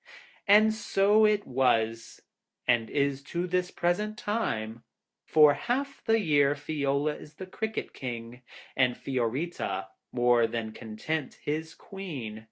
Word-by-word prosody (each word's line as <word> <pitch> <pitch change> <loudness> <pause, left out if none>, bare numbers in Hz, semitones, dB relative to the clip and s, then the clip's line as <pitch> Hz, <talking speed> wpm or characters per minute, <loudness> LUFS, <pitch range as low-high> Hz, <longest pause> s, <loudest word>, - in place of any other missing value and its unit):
And 215 +2 +6
so 210 0 +3
it 210 -1 +2
was, 115 -3 0 0.4
and 120 -2 +2
is 140 -1 0
to 175 +4 -2
this 180 0 0
present 210 +5 -1
time. 115 - -2 0.4
For 150 -2 +6
half 275 - -3
the 225 0 +3
year 145 -6 +3
Fiola 145 0 -1
is 150 - -13
the 190 - -7
Cricket 220 +4 -4
King, 120 -1 -6 0.3
and 125 -2 +2
Fiorita, 125 - -2 0.2
more 120 -1 +3
than 115 -1 -4
content, 125 +7 -4
his 160 +2 -3
Queen. 145 - -7
145 Hz, 125 wpm, -28 LUFS, 120-195 Hz, 0.4 s, And